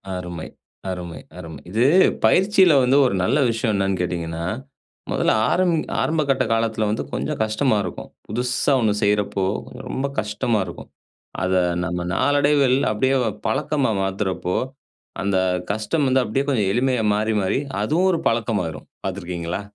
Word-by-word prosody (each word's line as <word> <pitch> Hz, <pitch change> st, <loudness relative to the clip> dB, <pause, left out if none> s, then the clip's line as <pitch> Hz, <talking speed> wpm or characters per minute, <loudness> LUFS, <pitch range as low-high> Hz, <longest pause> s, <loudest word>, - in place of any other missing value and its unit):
அருமை, 90 Hz, -3 st, -6 dB, 0.4 s
அருமை, 85 Hz, -4 st, -5 dB, 0.2 s
அருமை. 80 Hz, -5 st, -8 dB
இது 115 Hz, +4 st, +2 dB, 0.4 s
பயிற்சியில 190 Hz, -3 st, +5 dB
வந்து 130 Hz, +3 st, +4 dB
ஒரு 110 Hz, -, +1 dB
நல்ல 130 Hz, +9 st, +2 dB
விஷயம் 115 Hz, -1 st, 0 dB
என்னனு 95 Hz, -2 st, 0 dB
கேட்டீங்கன்னா, 85 Hz, -2 st, -3 dB, 0.7 s
மொதல்ல -, -, +2 dB, 0.2 s
ஆரம் 180 Hz, -2 st, +2 dB, 0.3 s
ஆரம்பகட்ட 150 Hz, -4 st, +1 dB
காலத்துல 110 Hz, -1 st, 0 dB
வந்து 105 Hz, -, -1 dB
கொஞ்ச -, -, -2 dB
கஷ்டமா 110 Hz, +1 st, +1 dB
இருக்கும். 90 Hz, -, -7 dB, 0.2 s
புதுசா 125 Hz, +5 st, 0 dB
ஒண்ணு 105 Hz, -2 st, +2 dB
செய்றப்போ 100 Hz, -2 st, +1 dB, 0.4 s
ரொம்ப 140 Hz, +1 st, -2 dB
கஷ்டமா 105 Hz, +1 st, -1 dB
இருக்கும். 85 Hz, -, -10 dB, 0.5 s
அத 95 Hz, 0 st, 0 dB, 0.3 s
நம்ம 85 Hz, +1 st, -3 dB
நாளடைவில் 145 Hz, -2 st, +3 dB
அப்டியே 130 Hz, +5 st, +1 dB, 0.3 s
பழக்கமா 140 Hz, -3 st, 0 dB
மாத்துறப்போ, 95 Hz, -2 st, -2 dB, 0.7 s
அந்த 100 Hz, -1 st, +1 dB, 0.3 s
கஷ்டம் 110 Hz, +8 st, -1 dB
வந்து 130 Hz, 0 st, +3 dB
அப்டியே 135 Hz, +6 st, -1 dB
கொஞ்சம் 105 Hz, -8 st, +1 dB
எளிமையா 125 Hz, -1 st, +1 dB
மாறி, 110 Hz, +1 st, 0 dB
மாறி 95 Hz, +7 st, 0 dB, 0.2 s
அது 145 Hz, +9 st, 0 dB
ஒரு 170 Hz, -, +1 dB
பழக்கமாயிரும் 105 Hz, -9 st, -2 dB, 0.2 s
பாத்துருக்கீங்களா? 90 Hz, -1 st, -4 dB
110 Hz, 130 wpm, -22 LUFS, 95-130 Hz, 0.7 s, பயிற்சியில